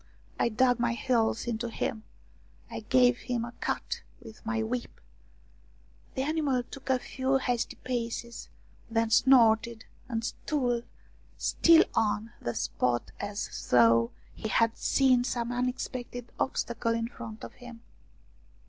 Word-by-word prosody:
1 235 -2 +1
dug 250 0 +4
my 235 -1 +1
heels 230 -2 +1
into 235 0 -2
him, 220 -1 -3 0.7
I 230 - -4
gave 245 +2 +4
him 245 -2 -2
a 240 - -8
cut - - -2 0.2
with 225 -3 -13
my 225 0 -1
whip; 240 +2 -4 1.2
the 265 - 0
animal 290 -4 0
took 275 +2 -11
a 260 - +4
few 265 +1 0
hasty 245 -3 -1
paces, 235 -1 -4 0.4
then 225 0 +1
snorted, 230 -2 +4 0.2
and 225 -2 -2
stood 245 -4 -1 0.5
still 330 -1 +5
on 220 0 0
the 120 - -3
spot 120 -1 -1
as 205 0 -5
though 115 -1 +5 0.2
he - - -5
had 230 +2 +2
seen 255 -3 +3
some 240 -1 -2
unexpected 245 -1 -3
obstacle 230 -3 0
in 230 0 -1
front 225 -2 -9
of - - -8
him. 245 -2 -12
235 Hz, 130 wpm, -29 LUFS, 225-250 Hz, 1.2 s, still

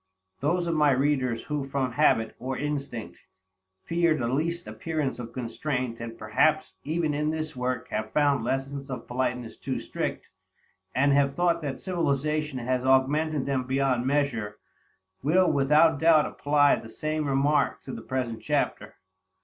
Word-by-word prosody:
_ - - -43
Those 170 +5 +1
of 170 - 0
my 150 -2 +4
readers 130 -3 +1
who 150 -2 -2
from 135 -1 -2
habit, 115 -5 +2
or 130 0 -3
instinct, 140 -10 -4 0.6
fear 170 -2 +2
the 120 - -1
least 170 +7 -1
appearance 155 -6 -3
of 120 -1 -6
constraint, 125 -1 -3
and 115 0 -7
perhaps 150 +9 +1
even 155 0 0
in 150 +1 0
this 155 -1 -3
work 125 0 -2
have 110 0 -3
found 145 -4 +2
lessons 135 +3 -3
of 125 -3 -5
politeness 125 -2 -2
too - - -3
strict, - - -4 0.7
and 140 +2 +4
have 140 -1 +3
thought 170 +1 +1
that 140 -3 -4
civilization 150 -4 -1
has 125 +1 -1
augmented 140 +3 +2
them 135 -2 -1
beyond 130 -1 +1
measure, 125 -8 0 0.6
will 175 +6 +3
without 150 +2 +4
doubt 160 -2 +5
apply 145 0 +3
the 110 - -10
same 155 +4 -2
remark 140 +2 +2
to - - -7
the - - -6
present 125 -4 -3
chapter. - - -1
140 Hz, 155 wpm, -27 LUFS, 130-155 Hz, 0.7 s, doubt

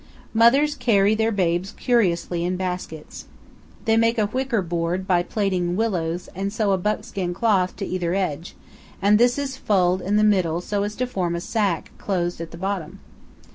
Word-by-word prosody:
Mothers 265 +7 +5
carry 215 -6 +3
their 220 +1 +1
babes 185 -1 0
curiously 180 -8 +1
in 180 +1 -1
baskets. 180 -4 -5 0.6
They 225 0 +3
make 230 +1 +3
a 215 - +3
wicker 245 -1 -1
board 170 +2 -2
by 180 -2 +3
plaiting 180 -3 -1
willows 180 -6 -1
and 195 +2 -3
sew 210 -1 0
a 190 - +3
buckskin 200 -3 -2
cloth 190 -4 +1
to 200 - -4
either 180 -1 -2
edge, 170 -4 -3 0.4
and 205 +2 +4
this 245 +2 +4
is 275 -2 -3
fulled 185 -6 +2
in 200 +3 0
the 210 - +4
middle 185 -6 +2
so 200 +3 -2
as 205 +1 -3
to 255 - -1
form 180 -8 -2
a - - -2
sack 195 -2 -1
closed 175 -3 -2
at 165 - -6
the 170 - -10
bottom. 190 -3 -4
195 Hz, 175 wpm, -23 LUFS, 175-220 Hz, 0.6 s, Mothers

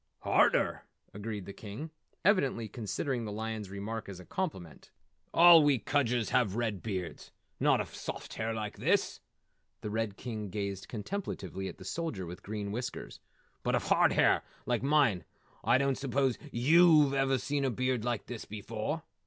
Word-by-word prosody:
"Harder!" - - +2 0.3
agreed 105 -1 -5
the 100 - -8
King, 110 +12 -8 0.3
evidently 140 - +2
considering 120 +3 -3
the 105 - -4
lion's 110 -1 -4
remark 100 +3 -5
a 90 -2 -9
compliment. 95 - -5 0.4
"All 170 -1 +9
we 145 -2 +4
Kudgers 120 -1 0
have 105 -6 +2
red 110 -5 -1
beards 95 -5 -5 0.3
not - - +4
of - - -4
soft - - -6
hair 110 +1 -2
like 110 -2 -4
his - - +1 0.3
" - - -48
The 105 - -4
Red 110 -2 -2
King 110 -4 -5
gazed 100 -1 -4
contemplatively 105 - -4
at - - -7
the 95 - -11
Soldier 105 - -3
with 85 +1 -8
Green 105 -1 -4
Whiskers, 120 +4 -5 0.4
"but - - +1
of - - -2
hard - - +5
hair - - +4 0.2
like 120 -2 0
mine. 135 - +3 0.4
I 120 +3 +4
don't 135 0 +1
suppose 135 -1 0
yew've 150 +3 +5
ever 135 -1 +2
seen 140 +2 -1
a 135 - +2
beard 130 -1 -1
like 120 -3 -2
this 120 -2 -7
before. 110 +9 -4
115 Hz, 160 wpm, -31 LUFS, 105-135 Hz, 0.4 s, All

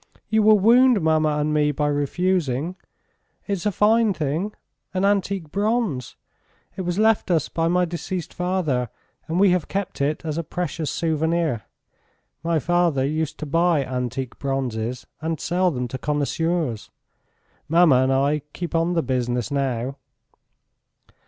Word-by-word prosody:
"You 220 0 +3
will 215 0 +6
wound 240 +3 +5
mamma 155 -2 +2
and 150 +1 0
me 150 -1 +2
by 150 +1 -1
refusing.... 145 +1 0 0.7
It's 200 -1 -2
a - - +2
fine 215 +1 +3
thing... 155 +6 -2 0.4
an 185 +1 +2
antique 195 -5 0
bronze.... 205 - -1 0.6
It - - -4
was 175 0 -2
left 220 -1 +3
us 165 -5 +1
by 165 0 0
my 180 +1 +2
deceased 175 0 -5
father 175 -10 -1 0.4
and 165 +2 -1
we 195 -1 +5
have 180 -3 0
kept 195 -5 -3
it 150 +4 -1
as 155 0 -2
a - - -2
precious 165 -1 -3
souvenir. 160 - 0 0.8
My 170 -1 +1
father 170 -4 +1
used 155 +1 -2
to - - -2
buy 165 -1 +2
antique 125 0 -4
bronzes 125 -3 -2 0.2
and 160 -1 -2
sell 180 +3 +1
them 125 -6 -3
to 130 - -5
connoisseurs... 150 -3 -1 0.8
Mamma 165 -4 +5
and 130 +1 +2
I 140 +3 +2
keep 175 -1 -5
on 165 +1 +1
the 165 -2 +1
business 125 0 -1
now." 135 -1 -1
160 Hz, 145 wpm, -23 LUFS, 140-180 Hz, 0.8 s, will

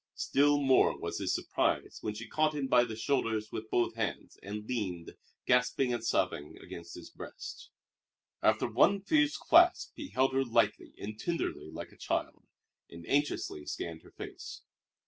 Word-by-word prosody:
Still 145 +1 +3
more 135 -2 +4
was - - -4
his - - 0
surprise - - -1
when 105 -1 -3
she 115 +2 -7
caught 155 0 +1
him 145 -2 -1
by 125 -2 +4
the 110 -2 -6
shoulders 110 -3 0
with 110 0 -6
both 120 0 +1
hands 110 -2 -3
and 105 +2 -6
leaned, 95 -9 -3 0.3
gasping 125 +1 +2
and 120 -2 -3
sobbing, 90 -9 -1
against 85 0 -9
his 85 - -10
breast. - - -9 0.7
After - - +3
one 200 -1 +4
fierce 305 +7 +2
clasp 345 +2 +5
he 295 - -6
held 130 0 +2
her 135 0 +3
lightly 115 -4 +1
and 110 +1 -7
tenderly 170 -1 -2
like - - -8
a - - -19
child, - - -3 0.4
and 85 0 -11
anxiously 140 - 0
scanned 80 -1 -5
her - - -17
face. - - -8
120 Hz, 165 wpm, -31 LUFS, 105-140 Hz, 0.7 s, clasp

